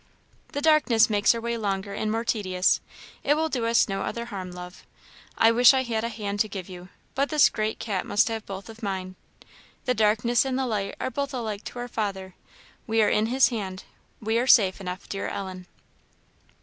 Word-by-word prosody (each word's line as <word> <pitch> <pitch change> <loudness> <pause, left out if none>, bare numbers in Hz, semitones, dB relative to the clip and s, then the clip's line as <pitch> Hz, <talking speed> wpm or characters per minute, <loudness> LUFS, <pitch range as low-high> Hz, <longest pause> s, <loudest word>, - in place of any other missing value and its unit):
"The 285 - -2
darkness 290 -8 +4
makes 205 +2 +4
our 230 - -4
way 235 0 -2
longer 200 -2 -2
and 215 +1 -2
more 225 +1 -1
tedious; 185 -5 +1 0.4
it 290 - +3
will 320 +1 0
do 245 -6 -1
us 230 0 +4
no 195 -1 -3
other 235 +3 -3
harm, 195 -6 -6
love. 180 0 -10 0.5
I 225 - +6
wish 245 +3 +7
I 260 - +2
had 225 -3 -2
a 230 - -1
hand 205 -3 -4
to 215 - +3
give 190 -3 -7
you, 180 0 -10 0.2
but 275 +1 0
this 305 -2 +5
great 215 0 -2
cat 200 -5 -2
must 205 - +2
have 225 -2 -3
both 195 0 -7
of 225 0 -12
mine. 190 -3 -4 0.7
The 250 - +2
darkness 220 +2 +2
and 265 -1 -2
the 265 - 0
light 205 -5 -2
are - - -2
both 280 0 -3
alike 220 -4 -4
to - - -8
our 245 0 -4
Father: 195 -5 -4 0.5
we 225 -1 +3
are - - +3
in 215 +1 +2
his 260 +3 +4
Hand; 195 -5 -5 0.4
we 220 +1 0
are 250 - -1
safe 200 -7 +5
enough, 180 0 -6
dear 195 - -4
Ellen." 185 -2 -6
220 Hz, 205 wpm, -26 LUFS, 195-235 Hz, 0.7 s, wish